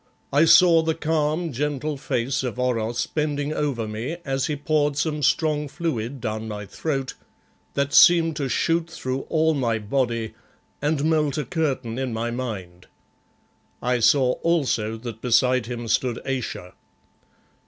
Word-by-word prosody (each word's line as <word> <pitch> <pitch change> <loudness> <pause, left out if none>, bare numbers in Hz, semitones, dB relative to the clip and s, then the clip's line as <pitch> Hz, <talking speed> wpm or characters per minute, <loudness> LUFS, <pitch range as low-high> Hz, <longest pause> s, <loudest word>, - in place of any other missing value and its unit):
I 150 +3 +5
saw 170 -1 +7
the 160 0 0
calm, 160 +1 0
gentle 150 +2 -2
face 135 -2 -1
of 125 -3 -4
Oros 120 -2 0
bending 150 -1 -2
over 135 -8 -1
me 115 +10 -4
as 135 -1 -1
he 150 - -1
poured 145 -1 0
some 150 0 -1
strong 150 +1 +1
fluid 135 -5 -3
down 110 0 -4
my 105 -1 -5
throat 135 +3 -3 0.6
that 140 0 0
seemed 165 -2 +6
to 140 -4 -2
shoot 165 +4 +1
through 130 -5 -4
all 160 0 +2
my 120 -6 0
body, 115 0 -1 0.5
and 150 0 0
melt 155 -3 +1
a 150 - -2
curtain 130 -5 -2
in 130 -3 -2
my 115 +1 -2
mind. 95 -8 -6 0.9
I 125 0 0
saw 125 +2 +4
also 130 -10 0
that 115 -1 -8
beside 125 0 +2
him 120 -1 -5
stood 120 +1 0
Ayesha. 125 -9 -4
135 Hz, 145 wpm, -24 LUFS, 120-155 Hz, 0.9 s, saw